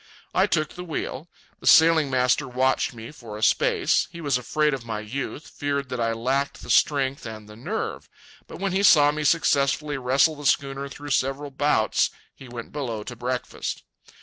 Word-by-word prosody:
I - - +3
took 155 0 0
the 180 - -7
wheel. 160 -2 -5 0.3
The - - -7
sailing 160 -2 +6
master 130 +2 +2
watched 130 +1 +1
me 115 0 -10
for 115 -8 -10
a 110 - -6
space. - - +2
He 170 - -9
was 145 -5 0
afraid 150 +4 +1
of 135 -3 -4
my 110 -2 -4
youth, 135 +7 -5
feared 140 -2 -3
that 125 - -4
I 115 -1 +1
lacked 135 +5 -1
the - - -4
strength 140 -2 +2
and 110 -1 -9
the 105 - -12
nerve. 115 - -4 0.4
But - - -9
when 195 0 -1
he 190 +2 +1
saw 145 -7 +6
me 155 +1 -3
successfully 145 -2 +2
wrestle 135 +5 +3
the 145 -1 -3
schooner 140 0 0
through 145 +1 -8
several 135 +2 0
bouts, 135 -6 +2 0.2
he 135 - -13
went 120 -1 -8
below 120 -7 -4
to 125 - -8
breakfast. 125 +1 -4
135 Hz, 185 wpm, -24 LUFS, 125-145 Hz, 0.4 s, sailing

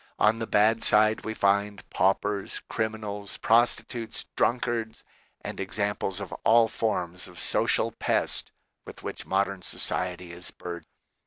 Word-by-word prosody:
On 110 +2 +3
the 115 - -3
bad 110 +2 +3
side 110 +1 +4
we 110 0 -4
find 100 0 +1
paupers, 95 +1 +1
criminals, 105 -2 -3
prostitutes, 115 0 +1
drunk 120 +1 +2
ards, 115 -2 -3 0.4
and - - -6
examples 100 0 -2
of 100 - -6
all 115 0 +6
forms 90 -6 -2
of - - -10
social - - +2
pest - - 0 0.3
with - - -11
which - - -6
modern 100 0 0
society 90 -1 -2
is 85 +1 -4
burdened. 85 -2 -7
105 Hz, 135 wpm, -27 LUFS, 95-110 Hz, 0.4 s, all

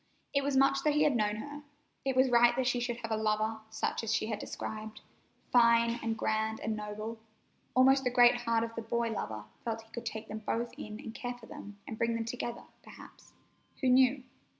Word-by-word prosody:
It 280 -1 +2
was 280 -1 +1
much 275 0 +4
that 295 +1 +2
he 300 - +4
had 295 -4 +3
known 210 -2 +1
her. 290 +7 -7 0.4
It 270 -1 0
was 260 0 +4
right 240 0 +6
that 260 0 0
she 245 0 +1
should 240 -1 -2
have 230 - -4
a - - +2
lover 215 0 0
such 220 +1 -2
as 225 - -1
she 225 - +1
had 210 - -2
described—"fine 235 +2 0
and 225 -1 -2
grand 220 0 0
and 220 0 -2
noble." 215 +2 -5 0.6
Almost 265 +1 +6
the 250 - +2
great 245 -1 +6
heart 230 -1 +1
of 230 0 -4
the 230 - -4
boy 230 +1 -1
lover 110 - -4 0.2
felt 225 -1 -3
he 225 - -24
could 235 -1 -6
take 220 0 -5
them 215 - -5
both 230 +2 -2
in 215 0 -7
and 225 - -8
care 245 +1 -4
for 245 -2 -14
them, 205 -2 -10
and 220 - -6
bring 230 0 +1
them 230 0 -2
together, 240 0 -4 0.2
perhaps—who 260 - -8
knew? 260 +1 +5
230 Hz, 210 wpm, -31 LUFS, 220-250 Hz, 0.6 s, right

